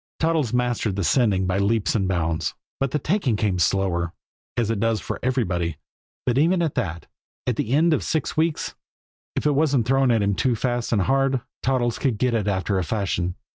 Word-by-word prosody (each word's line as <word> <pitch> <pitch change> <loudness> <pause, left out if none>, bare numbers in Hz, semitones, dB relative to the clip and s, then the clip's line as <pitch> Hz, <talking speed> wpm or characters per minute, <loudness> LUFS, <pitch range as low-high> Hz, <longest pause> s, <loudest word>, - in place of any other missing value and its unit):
Toddles 160 -7 +1
mastered 120 -4 0
the 100 - -1
"sending" 95 - +2
by 90 +1 0
leaps 100 -2 +1
and 95 -4 +1
bounds; 85 -3 -1 0.2
but 135 -1 +1
the 150 - 0
"taking" 150 - 0
came 100 -4 0
slower, 85 -3 +1 0.4
as 115 -2 +1
it 110 - -1
does 115 0 +1
for - - -5
everybody 90 - 0 0.5
but 125 +1 +2
even 170 +3 +3
at 160 - -1
that, 85 -3 -3 0.4
at 125 - 0
the 110 - -2
end 160 +3 +4
of - - +1
six 160 - -1
weeks, 160 0 0 0.6
if - - -2
it 150 - +4
wasn't 140 -5 +2
thrown 135 +1 +3
at 115 -3 +3
him 100 0 +1
too 120 +6 +1
fast 120 +1 -1
and 105 -5 +2
hard, 135 0 +2 0.2
Toddles 125 -3 0
could 130 -6 0
get 125 +2 +1
it 110 -3 0
after 95 0 0
a - - 0
fashion. 90 -2 -1
115 Hz, 200 wpm, -23 LUFS, 95-135 Hz, 0.6 s, end